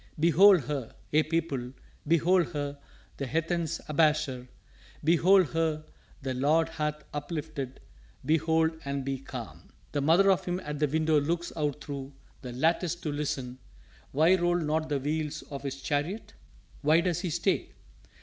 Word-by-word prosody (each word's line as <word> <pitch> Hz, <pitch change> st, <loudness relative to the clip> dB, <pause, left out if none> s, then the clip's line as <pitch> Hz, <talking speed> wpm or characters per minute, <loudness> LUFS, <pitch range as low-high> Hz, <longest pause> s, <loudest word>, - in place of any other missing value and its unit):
"Behold 175 Hz, +3 st, +6 dB
her, 135 Hz, -3 st, -5 dB, 0.2 s
ye 155 Hz, -, +5 dB
people, 155 Hz, -6 st, -2 dB, 0.3 s
behold 170 Hz, +2 st, +3 dB
her 145 Hz, -1 st, -3 dB, 0.4 s
the 140 Hz, -, -3 dB
heathen's 165 Hz, +3 st, -1 dB
abasher; 150 Hz, -4 st, +1 dB, 0.6 s
Behold 175 Hz, +3 st, +5 dB
her 160 Hz, -2 st, -1 dB, 0.4 s
the 130 Hz, -1 st, -2 dB
Lord 155 Hz, +5 st, +2 dB
hath 150 Hz, -1 st, -3 dB
uplifted 145 Hz, -3 st, -5 dB, 0.5 s
behold 160 Hz, +1 st, +2 dB
and 140 Hz, -1 st, -3 dB
be 135 Hz, -1 st, -2 dB
calm! 125 Hz, -4 st, -9 dB, 0.2 s
"The 145 Hz, -, -1 dB
mother 175 Hz, +7 st, +5 dB
of 190 Hz, -, +1 dB
him 180 Hz, 0 st, -1 dB
at 150 Hz, -1 st, -5 dB
the 150 Hz, -, +3 dB
window 155 Hz, +1 st, +2 dB
looks 170 Hz, +4 st, -2 dB
out 150 Hz, -2 st, -2 dB
thro' 140 Hz, -1 st, -6 dB, 0.3 s
the 125 Hz, -, -7 dB
lattice 165 Hz, +6 st, +1 dB
to 160 Hz, -3 st, -4 dB
listen 135 Hz, -4 st, -3 dB, 0.5 s
Why 160 Hz, +6 st, +4 dB
roll 175 Hz, -1 st, +1 dB
not 155 Hz, -1 st, -1 dB
the 145 Hz, -, +1 dB
wheels 150 Hz, +2 st, -2 dB
of 140 Hz, -, -5 dB
his 140 Hz, -1 st, -5 dB
chariot? 160 Hz, +8 st, -2 dB, 0.5 s
why 155 Hz, +3 st, +4 dB
does 175 Hz, -1 st, 0 dB
he 180 Hz, -1 st, -2 dB
stay? 155 Hz, -, 0 dB
155 Hz, 150 wpm, -29 LUFS, 140-165 Hz, 0.6 s, Behold